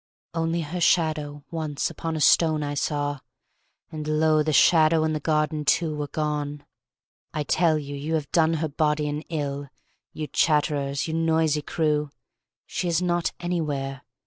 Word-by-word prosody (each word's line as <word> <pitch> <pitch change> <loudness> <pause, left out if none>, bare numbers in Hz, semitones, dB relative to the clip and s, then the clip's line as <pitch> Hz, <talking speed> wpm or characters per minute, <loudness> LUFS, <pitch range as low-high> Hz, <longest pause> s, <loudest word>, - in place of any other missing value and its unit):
Only 165 0 0
her 170 +3 -4
shadow 155 -4 +1
once 155 -3 -2
upon 165 -1 -4
a 155 - -2
stone 155 -1 +4
I 145 0 -3
saw, 145 0 -1 0.7
and, 155 -1 -5
lo, 155 0 +3
the 155 +1 0
shadow 160 +2 +5
and 155 0 0
the 155 - -1
garden, 155 0 0
too, 155 +1 +1
were 150 -1 -3
gone. 150 -1 -3 0.7
I 150 - 0
tell 160 +2 +2
you 145 -1 -5
you 150 +3 -2
have 150 -3 -3
done 165 -1 +3
her 160 0 -1
body 150 0 0
an 150 +1 -3
ill, 145 -3 -3 0.4
You 155 - -5
chatterers, 145 -2 +1
you 160 - -3
noisy 160 -2 +2
crew! 150 -1 0 0.6
She 180 - -3
is 170 -1 +2
not 175 -1 0
anywhere! 145 -6 -2
155 Hz, 160 wpm, -25 LUFS, 145-160 Hz, 0.7 s, shadow